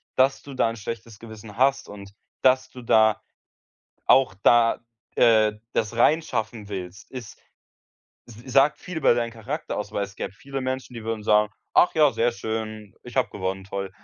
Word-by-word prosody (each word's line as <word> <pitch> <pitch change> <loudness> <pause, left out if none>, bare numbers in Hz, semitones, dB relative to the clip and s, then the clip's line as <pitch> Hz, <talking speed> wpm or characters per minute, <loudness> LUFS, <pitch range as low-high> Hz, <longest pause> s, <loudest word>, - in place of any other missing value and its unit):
Dass 135 +1 +3
du 140 - -10
da 120 - +2
'n 115 - -5
schlechtes 110 0 -7
Gewissen 110 -2 -11
hast 135 +2 +2
und 100 -1 -10 0.3
dass 130 0 +3
du 125 - -10
da 110 -2 +3 0.9
auch 130 -8 +5
da, 120 -1 +4 0.4
äh, 110 -2 +5 0.2
das 110 +1 -1
reinschaffen 120 -6 +1
willst, 95 0 -7
ist 125 -4 -9 0.9
Das 120 - -13 0.2
sagt 140 +2 +4
viel 180 -3 -6
über 150 - +4
deinen 120 -1 -1
Charakter 125 +8 -5
aus, 105 -1 -5
weil 100 - -1
es 100 - -11
gäbe - - -5
viele 135 +5 -6
Menschen, 130 0 -4
die 115 - -7
würden 110 -1 -3
sagen: 105 0 +3 0.2
„Ach 180 - +4
ja, 150 -3 +5
sehr 120 +1 +1
schön, 110 -2 -5
ich - - -12
habe - - +2
gewonnen, 95 +1 -4
toll.“ 100 0 -5
115 Hz, 175 wpm, -24 LUFS, 105-130 Hz, 0.9 s, auch